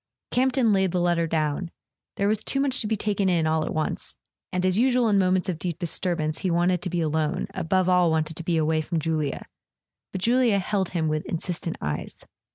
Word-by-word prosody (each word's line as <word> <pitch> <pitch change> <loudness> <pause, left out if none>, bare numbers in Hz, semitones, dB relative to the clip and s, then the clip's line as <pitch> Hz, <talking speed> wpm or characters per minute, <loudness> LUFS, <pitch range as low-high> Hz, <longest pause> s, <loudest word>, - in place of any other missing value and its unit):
Campton 255 -3 +2
laid 190 -2 +2
the 180 - +1
letter 175 -1 +1
down. 155 +2 -1 0.5
There 200 - 0
was 215 0 +1
too 275 - -1
much 275 -1 +1
to 215 - -2
be 220 0 0
taken 200 -2 0
in 170 -3 +2
all 155 0 +1
at - - -3
once; 155 - -3 0.4
and, 180 0 -1
as 185 +2 +2
usual 250 -1 +3
in 205 -2 +3
moments 185 0 +2
of 175 -4 -2
deep 175 -3 -3
disturbance, 165 -2 -1
he 190 - -1
wanted 175 +1 +2
to 180 - -3
be 175 -1 -1
alone, 155 +1 0
above 185 +1 +1
all 180 -2 +4
wanted 160 0 0
to 170 - -5
be 170 0 0
away 155 0 +1
from 165 +2 -3
Julia. 155 -3 -2 0.7
But 190 - -5
Julia 235 -1 +3
held 195 -1 -1
him 165 -3 -1
with 155 0 -1
insistent 170 0 -4
eyes. 75 0 -4
180 Hz, 210 wpm, -25 LUFS, 160-195 Hz, 0.7 s, all